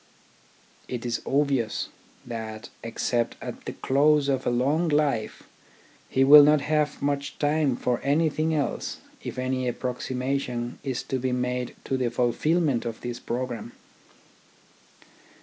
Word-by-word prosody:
It 125 Hz, -1 st, -5 dB
is 120 Hz, -1 st, -1 dB
obvious 135 Hz, -5 st, +1 dB, 0.4 s
that, 110 Hz, -1 st, -6 dB
except 115 Hz, +1 st, -1 dB
at -, -, -8 dB
the -, -, -4 dB
close 145 Hz, +1 st, +3 dB
of 135 Hz, -1 st, 0 dB
a -, -, +4 dB
long 140 Hz, +8 st, +1 dB
life, 145 Hz, -7 st, 0 dB, 0.7 s
he 135 Hz, -, +3 dB
will 145 Hz, +2 st, +10 dB
not 150 Hz, 0 st, +5 dB
have 150 Hz, -1 st, 0 dB
much 140 Hz, 0 st, -1 dB
time 145 Hz, -3 st, +2 dB
for 125 Hz, 0 st, 0 dB
anything 155 Hz, +2 st, +1 dB
else 145 Hz, -2 st, -2 dB, 0.3 s
if -, -, -6 dB
any 130 Hz, 0 st, -1 dB
approximation 125 Hz, 0 st, -2 dB
is 130 Hz, -3 st, -2 dB
to 130 Hz, -, -2 dB
be 130 Hz, 0 st, -1 dB
made 125 Hz, 0 st, -2 dB
to 135 Hz, -, -1 dB
the 125 Hz, -2 st, 0 dB
fulfilment 125 Hz, +3 st, +1 dB
of 115 Hz, -2 st, -5 dB
this 120 Hz, 0 st, -5 dB
programme. 120 Hz, -1 st, -4 dB
130 Hz, 130 wpm, -26 LUFS, 120-145 Hz, 0.7 s, will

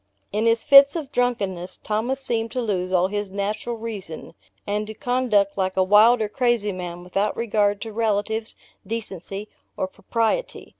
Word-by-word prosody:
In 215 Hz, +3 st, 0 dB
his 230 Hz, 0 st, +2 dB
fits 280 Hz, +1 st, +8 dB
of 300 Hz, -5 st, -5 dB
drunkenness, 195 Hz, -8 st, -1 dB
Thomas 225 Hz, +6 st, -2 dB
seemed 230 Hz, -3 st, -2 dB
to 255 Hz, -, -2 dB
lose 185 Hz, -4 st, -2 dB
all 185 Hz, 0 st, +3 dB
his 205 Hz, 0 st, -3 dB
natural 210 Hz, +4 st, -3 dB
reason, 210 Hz, -8 st, -7 dB, 0.3 s
and 210 Hz, +1 st, -2 dB
to 220 Hz, -, -7 dB
conduct 215 Hz, -6 st, +1 dB
like 190 Hz, 0 st, -1 dB
a 190 Hz, -, +5 dB
wild 215 Hz, +4 st, +5 dB
or -, -, -1 dB
crazy 240 Hz, -2 st, +1 dB
man, 175 Hz, -1 st, -6 dB
without 195 Hz, +4 st, -1 dB
regard 205 Hz, -3 st, +1 dB
to 225 Hz, -2 st, -6 dB
relatives, 220 Hz, 0 st, -1 dB, 0.3 s
decency 205 Hz, -2 st, -5 dB, 0.3 s
or 185 Hz, -, -1 dB
propriety. 230 Hz, -, -2 dB
210 Hz, 160 wpm, -23 LUFS, 195-230 Hz, 0.3 s, fits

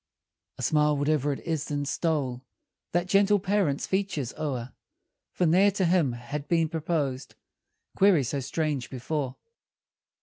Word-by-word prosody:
A -, -, -6 dB
smile, 150 Hz, -1 st, +3 dB
whate'er 145 Hz, 0 st, +1 dB
it 140 Hz, -, -4 dB
is, 160 Hz, -3 st, -2 dB
then 145 Hz, -1 st, -2 dB
stole 140 Hz, -5 st, -1 dB, 0.5 s
That 175 Hz, +1 st, +1 dB
gentle 200 Hz, +2 st, +4 dB
parent's 190 Hz, -7 st, 0 dB
features 190 Hz, -, -2 dB
o'er; 130 Hz, -5 st, -4 dB, 0.6 s
For 180 Hz, -, 0 dB
ne'er 185 Hz, +5 st, +5 dB
to 190 Hz, -2 st, +1 dB
him 170 Hz, -7 st, +2 dB
had 140 Hz, +5 st, -6 dB
been 165 Hz, -1 st, +2 dB
proposed 150 Hz, -5 st, -2 dB, 0.6 s
Query 190 Hz, -7 st, +5 dB
so 140 Hz, +3 st, -2 dB
strange 140 Hz, -1 st, -2 dB
before. 130 Hz, 0 st, -3 dB
150 Hz, 135 wpm, -27 LUFS, 135-175 Hz, 0.6 s, ne'er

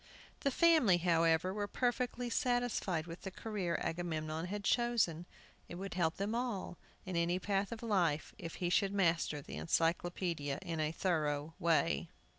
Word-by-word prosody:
The 275 Hz, -, +1 dB
family, 305 Hz, -, +5 dB
however, 165 Hz, +1 st, +2 dB
were 205 Hz, 0 st, -2 dB
perfectly 245 Hz, +1 st, -1 dB
satisfied 245 Hz, -, 0 dB
with 170 Hz, 0 st, -8 dB
the 190 Hz, -, -5 dB
career 190 Hz, -4 st, -2 dB
Agamemnon 160 Hz, -1 st, -2 dB
had 205 Hz, +2 st, -4 dB
chosen. 205 Hz, -9 st, +1 dB, 0.4 s
It -, -, -6 dB
would 195 Hz, +2 st, -5 dB
help 165 Hz, -2 st, 0 dB
them 200 Hz, +3 st, -1 dB
all, 230 Hz, -7 st, -3 dB, 0.3 s
in 185 Hz, -1 st, -4 dB
any 170 Hz, +1 st, +2 dB
path 195 Hz, +2 st, -1 dB
of 230 Hz, 0 st, -6 dB
life, 175 Hz, -9 st, +1 dB
if 165 Hz, -, -6 dB
he 175 Hz, -1 st, -1 dB
should 195 Hz, +2 st, +2 dB
master 165 Hz, -6 st, +1 dB
the -, -, -7 dB
Encyclopædia 165 Hz, -, 0 dB
in 165 Hz, -3 st, -3 dB
a 155 Hz, 0 st, +1 dB
thorough 155 Hz, -3 st, -1 dB
way. 165 Hz, 0 st, +2 dB
175 Hz, 155 wpm, -35 LUFS, 165-205 Hz, 0.4 s, family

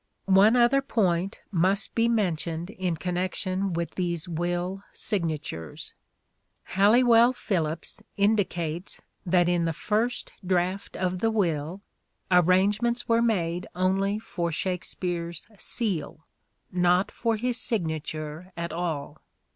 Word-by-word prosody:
One 200 Hz, +4 st, +6 dB
other 250 Hz, +3 st, +4 dB
point 195 Hz, -8 st, 0 dB
must 190 Hz, +3 st, +1 dB
be 230 Hz, 0 st, +2 dB
mentioned 175 Hz, -5 st, -1 dB
in 180 Hz, -4 st, -2 dB
connection 185 Hz, +2 st, -2 dB
Missing 190 Hz, -, -1 dB
with 170 Hz, 0 st, -2 dB
these 175 Hz, -2 st, -2 dB
will 175 Hz, +3 st, -2 dB
signatures. 155 Hz, -, -2 dB, 0.8 s
Halliwell 235 Hz, +5 st, +6 dB
Phillipps 165 Hz, -9 st, -2 dB, 0.2 s
indicates 185 Hz, -5 st, 0 dB
S1gnatures -, -, -19 dB, 0.3 s
that 175 Hz, -2 st, +4 dB
in 175 Hz, -1 st, +2 dB
the 165 Hz, -, 0 dB
first 220 Hz, +8 st, -1 dB
draft 185 Hz, +1 st, -1 dB
of 185 Hz, -1 st, -1 dB
the 225 Hz, -, +2 dB
will, 175 Hz, -3 st, -1 dB, 0.5 s
arrangements 200 Hz, +7 st, +3 dB
were 230 Hz, 0 st, +3 dB
made 180 Hz, -7 st, 0 dB
only 195 Hz, +3 st, +1 dB
for 175 Hz, -6 st, -3 dB
Shakspere's 175 Hz, -1 st, -3 dB
" 210 Hz, -, -21 dB, 0.2 s
seal 175 Hz, -8 st, -2 dB, 0.2 s
": -, -, -47 dB, 0.2 s
not 180 Hz, +2 st, +3 dB
for 230 Hz, -1 st, 0 dB
his 240 Hz, +1 st, 0 dB
signature 160 Hz, -3 st, -2 dB
at 170 Hz, -1 st, -3 dB
all. 165 Hz, -4 st, -3 dB
185 Hz, 125 wpm, -27 LUFS, 170-210 Hz, 0.8 s, One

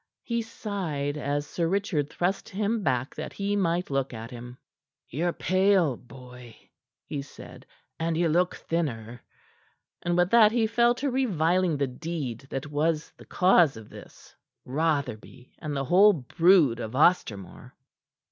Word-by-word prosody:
He 235 Hz, -2 st, -1 dB
sighed 185 Hz, -11 st, -4 dB
as 145 Hz, 0 st, -2 dB
Sir 165 Hz, +2 st, -2 dB
Richard 175 Hz, -6 st, -1 dB
thrust 180 Hz, +5 st, -2 dB
him 210 Hz, +3 st, -1 dB
back 130 Hz, -5 st, -1 dB
that -, -, -7 dB
he 200 Hz, +1 st, -2 dB
might 175 Hz, -4 st, 0 dB
look 135 Hz, -2 st, -1 dB
at 115 Hz, +2 st, -8 dB
him. 125 Hz, 0 st, -9 dB, 0.5 s
"Ye're 170 Hz, +7 st, -1 dB
pale, 185 Hz, -6 st, +2 dB
boy," 125 Hz, -1 st, -13 dB, 0.5 s
he 145 Hz, -2 st, -4 dB
said, 140 Hz, -, -13 dB, 0.3 s
"and 165 Hz, 0 st, -1 dB
ye 170 Hz, 0 st, +2 dB
look 175 Hz, +3 st, +1 dB
thinner." 120 Hz, -8 st, -4 dB, 0.8 s
And 175 Hz, 0 st, 0 dB
with 175 Hz, +1 st, +2 dB
that 225 Hz, -2 st, +7 dB
he 235 Hz, -2 st, +2 dB
fell 235 Hz, +2 st, +3 dB
to 275 Hz, +2 st, -2 dB
reviling 180 Hz, -, +1 dB
the 140 Hz, -, +1 dB
deed 135 Hz, -3 st, -5 dB
that 135 Hz, -, -4 dB
was 155 Hz, +1 st, 0 dB
the -, -, -14 dB
cause 175 Hz, -, +3 dB
of 110 Hz, -2 st, -12 dB
this, -, -, -14 dB, 0.3 s
Rotherby 135 Hz, -4 st, -3 dB
and 150 Hz, -3 st, -4 dB
the 135 Hz, -, -2 dB
whole 200 Hz, +8 st, +6 dB
brood 165 Hz, -3 st, +3 dB
of 110 Hz, +1 st, -5 dB
Ostermore. 125 Hz, -, +1 dB
160 Hz, 145 wpm, -27 LUFS, 130-185 Hz, 0.8 s, that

